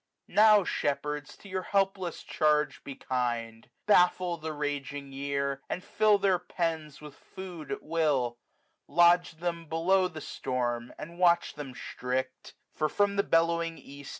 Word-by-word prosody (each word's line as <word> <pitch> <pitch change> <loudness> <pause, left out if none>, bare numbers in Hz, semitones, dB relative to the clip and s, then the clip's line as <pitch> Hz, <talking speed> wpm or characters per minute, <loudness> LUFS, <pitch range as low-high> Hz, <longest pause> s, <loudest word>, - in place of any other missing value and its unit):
Now, 215 -1 +6
shepherds, 150 -2 -2
to - - -14
your 185 -1 -3
helpless 195 -2 -1
charge 150 -1 +1
be 140 - -7
kindf 120 -3 -3 0.2
Baffle 180 -3 +4
the 160 0 -5
raging 145 -1 -4
year, 140 0 -2
and 185 - -3
fill 215 0 +3
their 190 -2 +2
pens 165 -4 -3
266 - - -18
With 150 -2 -10 0.2
food 175 -6 -7
at - - -4
will; 145 -7 0 0.5
lo^e 175 +3 +5
them 170 -1 -3
below 185 +4 +2
the 160 -3 -8
storm. 120 -4 -3
And 170 +2 -9
watch 175 -1 +3
them 135 -4 -8
strict: 130 +1 -4 0.2
for 155 -1 0
from 205 +3 +1
the 200 - +4
bellowing 165 -2 +1
east. 140 0 -11
160 Hz, 150 wpm, -29 LUFS, 140-180 Hz, 0.5 s, Now